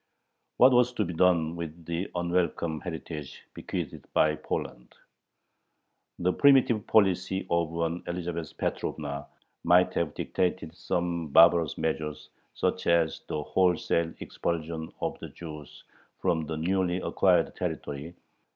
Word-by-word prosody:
What 130 Hz, -, +7 dB
was 125 Hz, 0 st, +4 dB
to 105 Hz, -4 st, 0 dB
be 90 Hz, -, -4 dB
done 85 Hz, -2 st, +3 dB
with 85 Hz, 0 st, -7 dB
the 85 Hz, +3 st, -3 dB
unwelcome 85 Hz, -2 st, 0 dB
heritage 80 Hz, -4 st, -7 dB
bequeathed -, -, -6 dB
by 75 Hz, 0 st, +4 dB
Poland? -, -, -5 dB, 1.2 s
The 90 Hz, +1 st, +1 dB
primitive 130 Hz, -6 st, +4 dB
policy 95 Hz, -3 st, +2 dB
of 85 Hz, -1 st, 0 dB
an 85 Hz, +1 st, -1 dB
Elizabeth 85 Hz, -3 st, -4 dB
Petrovna 70 Hz, -2 st, -3 dB, 0.4 s
might 90 Hz, +1 st, +4 dB
have 80 Hz, -3 st, -1 dB
dictated 90 Hz, -2 st, -2 dB
some 85 Hz, -2 st, -2 dB
barbarous 85 Hz, +1 st, +5 dB
measure, 75 Hz, -2 st, -1 dB, 0.4 s
such 95 Hz, -, -1 dB
as 85 Hz, -2 st, +2 dB
the 75 Hz, -, -3 dB
wholesale 85 Hz, -1 st, +1 dB
expulsion 80 Hz, -1 st, -4 dB
of -, -, -2 dB
the -, -, -8 dB
Jews 75 Hz, -3 st, -10 dB, 0.3 s
from 80 Hz, -3 st, 0 dB
the 80 Hz, -, -3 dB
newly 90 Hz, +2 st, 0 dB
acquired -, -, +2 dB
territory. 75 Hz, +4 st, -5 dB
85 Hz, 125 wpm, -28 LUFS, 80-90 Hz, 1.2 s, What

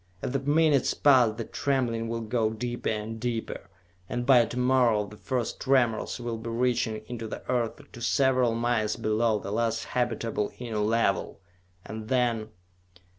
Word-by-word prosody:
As -, -, -2 dB
the 135 Hz, -, 0 dB
minutes 145 Hz, 0 st, +2 dB
pass 125 Hz, -6 st, +5 dB
the 115 Hz, -, -3 dB
trembling 120 Hz, -4 st, -1 dB
will 115 Hz, 0 st, -3 dB
go 110 Hz, 0 st, 0 dB
deeper 120 Hz, +2 st, -3 dB
and 110 Hz, +1 st, -3 dB
deeper, 115 Hz, -1 st, -4 dB, 0.4 s
and 120 Hz, 0 st, -2 dB
by 125 Hz, -3 st, +6 dB
to 120 Hz, -, -7 dB
morrow 125 Hz, -4 st, +3 dB
the 105 Hz, +1 st, -12 dB
first 125 Hz, +2 st, -3 dB
tremors 125 Hz, -4 st, +1 dB
will 120 Hz, -2 st, -4 dB
be 115 Hz, +1 st, -6 dB
reaching 115 Hz, -2 st, 0 dB
into 115 Hz, -2 st, -6 dB
the -, -, -8 dB
Earth 120 Hz, -3 st, 0 dB, 0.2 s
to 120 Hz, -, -11 dB
several 125 Hz, -1 st, +2 dB
miles 115 Hz, -2 st, 0 dB
below 110 Hz, 0 st, +1 dB
the 100 Hz, -, -6 dB
last 115 Hz, +1 st, 0 dB
habitable 115 Hz, -4 st, -1 dB
Inner 115 Hz, -3 st, -4 dB
Level! 105 Hz, -3 st, 0 dB, 0.5 s
And 110 Hz, 0 st, -7 dB
then.... 120 Hz, -3 st, +1 dB
115 Hz, 160 wpm, -27 LUFS, 110-125 Hz, 0.5 s, by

